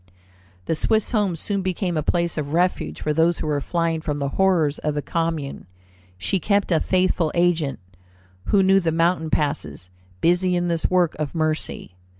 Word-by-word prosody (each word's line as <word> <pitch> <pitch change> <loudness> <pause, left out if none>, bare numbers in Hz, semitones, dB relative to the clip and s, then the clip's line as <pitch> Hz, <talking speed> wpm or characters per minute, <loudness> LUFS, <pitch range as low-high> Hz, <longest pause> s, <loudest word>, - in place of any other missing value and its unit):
The - - 0
Swiss 220 +6 +1
home 205 -6 +1
soon 200 +4 -2
became 185 -1 -2
a 155 - +1
place 170 +2 0
of 150 -1 -4
refuge 165 - 0
for 150 - 0
those 165 +2 +2
who - - -4
were 150 -2 0
flying 165 0 -1
from 150 -2 -3
the 140 -1 -2
horrors 165 -4 +2
of 150 -1 -2
the 145 - -2
Commune. 165 - -3 0.5
She 185 - -1
kept 200 +1 +1
a 165 - +4
faithful 180 -3 +1
agent, 170 -5 +1 0.7
who 195 - +3
knew 190 +1 +5
the 170 -3 0
mountain 165 0 +1
passes, 90 - -2 0.3
busy 180 - +2
in 175 0 0
this 165 -1 0
work 180 -3 +2
of 155 +1 -3
mercy. 155 - -3
165 Hz, 175 wpm, -23 LUFS, 150-180 Hz, 0.7 s, knew